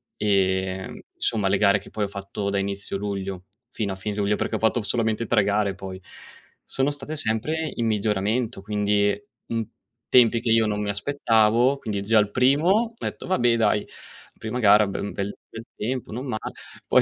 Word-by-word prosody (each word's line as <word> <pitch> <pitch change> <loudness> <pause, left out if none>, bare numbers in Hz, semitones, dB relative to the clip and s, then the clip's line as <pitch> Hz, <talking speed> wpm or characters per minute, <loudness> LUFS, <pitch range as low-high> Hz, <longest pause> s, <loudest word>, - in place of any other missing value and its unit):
ehm, 95 -2 0 0.2
insomma, 105 -3 0
le 100 - +3
gare 100 0 +4
che, 95 - -14
poi, 105 -1 -2
ho - - -4
fatto 100 0 -4
da 100 0 0
inizio 100 0 -3
luglio, 95 -2 -4 0.3
fino 105 -3 -2
a - - -6
fine 100 +2 -4
luglio, 105 0 +1
perché - - -2
ho - - -1
fatto 115 +1 +2
solamente 110 0 0
3 110 -2 +3
gare, 100 0 +1
poi, 95 -1 -7 0.6
sono 135 +2 0
state 150 +2 -6
sempre 150 +7 0
in 115 - -1
miglioramento, 105 +2 0
quindi, 105 - +1 0.3
in 115 -2 -2 0.4
tempi 120 -2 +5
che 115 0 -1
io 115 -1 +5
non 105 -1 -1
mi 105 - -2
aspettavo. 115 +2 +2
Quindi, 105 -5 -3
già 110 +2 +3
al 105 -1 +1
primo, 140 - +3
ho 225 +3 +2
detto: - - -5
“Vabbè, 120 -10 +3
dai, 105 -2 +2 0.5
prima 110 +3 -4
gara 105 -2 +6
ben 100 +1 -4
bel, 100 0 -3
bel 115 +1 -9
tempo, 125 +3 -3
non 125 +4 -4
male”. 110 -4 -4 0.3
Poi, - - +5
105 Hz, 185 wpm, -24 LUFS, 100-115 Hz, 0.6 s, gara